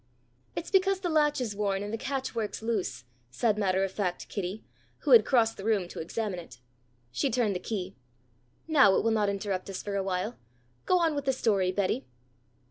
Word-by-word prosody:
"It's 335 Hz, -, -5 dB
because 385 Hz, 0 st, +3 dB
the 350 Hz, -3 st, -1 dB
latch 295 Hz, -2 st, +3 dB
is 225 Hz, -5 st, -3 dB
worn 200 Hz, -1 st, 0 dB
and 205 Hz, +1 st, -5 dB
the -, -, +2 dB
catch 265 Hz, +1 st, -3 dB
works 220 Hz, -2 st, -3 dB
loose," 185 Hz, -, -2 dB, 0.3 s
said 215 Hz, -, +1 dB
matter 190 Hz, -2 st, +1 dB
of 195 Hz, -, -1 dB
fact 185 Hz, -3 st, -3 dB
Kitty, 200 Hz, +1 st, -4 dB, 0.4 s
who -, -, -1 dB
had 475 Hz, -, +9 dB
crossed 230 Hz, -4 st, +3 dB
the 195 Hz, -, -7 dB
room 210 Hz, -4 st, +1 dB
to -, -, -7 dB
examine 190 Hz, +3 st, -3 dB
it. 165 Hz, -, -11 dB, 0.5 s
She 125 Hz, -, 0 dB
turned 225 Hz, -3 st, +1 dB
the -, -, -1 dB
key. 190 Hz, -3 st, -4 dB, 0.7 s
"Now 275 Hz, -12 st, +6 dB
it -, -, +2 dB
will 225 Hz, -, +2 dB
not 210 Hz, -2 st, +2 dB
interrupt 195 Hz, -1 st, -3 dB
us 195 Hz, -, -5 dB
for 200 Hz, -1 st, -3 dB
awhile. 195 Hz, +3 st, -2 dB, 0.5 s
Go 365 Hz, -, +5 dB
on 330 Hz, -3 st, +2 dB
with 285 Hz, -1 st, -3 dB
the 265 Hz, -, +2 dB
story, 200 Hz, -7 st, +1 dB
Betty." 185 Hz, -9 st, -1 dB
210 Hz, 200 wpm, -29 LUFS, 190-250 Hz, 0.7 s, had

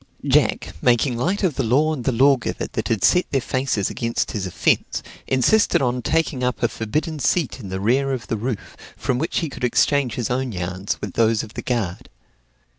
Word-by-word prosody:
Jack, -, -, +2 dB
making 125 Hz, +1 st, +3 dB
light 180 Hz, -, -1 dB
of 170 Hz, -7 st, +1 dB
the 135 Hz, -, +1 dB
law 145 Hz, +7 st, +2 dB
and 130 Hz, -6 st, -5 dB
the -, -, +2 dB
lawgiver 130 Hz, +1 st, +2 dB
that -, -, -4 dB
had 110 Hz, -4 st, 0 dB
set 180 Hz, -, +4 dB
their 135 Hz, -, +1 dB
faces 130 Hz, -6 st, -1 dB
against 115 Hz, -1 st, -2 dB
his 100 Hz, -4 st, -3 dB
offence, 90 Hz, -, 0 dB, 0.2 s
insisted 135 Hz, -, +3 dB
on 125 Hz, -1 st, 0 dB
taking 155 Hz, -1 st, 0 dB
up 125 Hz, -1 st, -1 dB
a -, -, +5 dB
forbidden 150 Hz, +8 st, -3 dB
seat 145 Hz, 0 st, 0 dB
in 100 Hz, -6 st, -8 dB
the 95 Hz, 0 st, -3 dB
rear 130 Hz, +7 st, +2 dB
of 130 Hz, -3 st, -3 dB
the -, -, -2 dB
roof, 115 Hz, 0 st, -4 dB, 0.2 s
from 130 Hz, -2 st, -1 dB
which 160 Hz, +5 st, -1 dB
he 165 Hz, -, -1 dB
could 135 Hz, -, -9 dB
exchange 135 Hz, +1 st, +2 dB
his 120 Hz, -1 st, -2 dB
own 130 Hz, 0 st, -1 dB
yarns 90 Hz, +2 st, -3 dB
with 100 Hz, -3 st, -5 dB
those 115 Hz, -1 st, +2 dB
of 110 Hz, -, -10 dB
the -, -, -5 dB
guard. 110 Hz, -8 st, -3 dB
125 Hz, 200 wpm, -22 LUFS, 115-140 Hz, 0.2 s, a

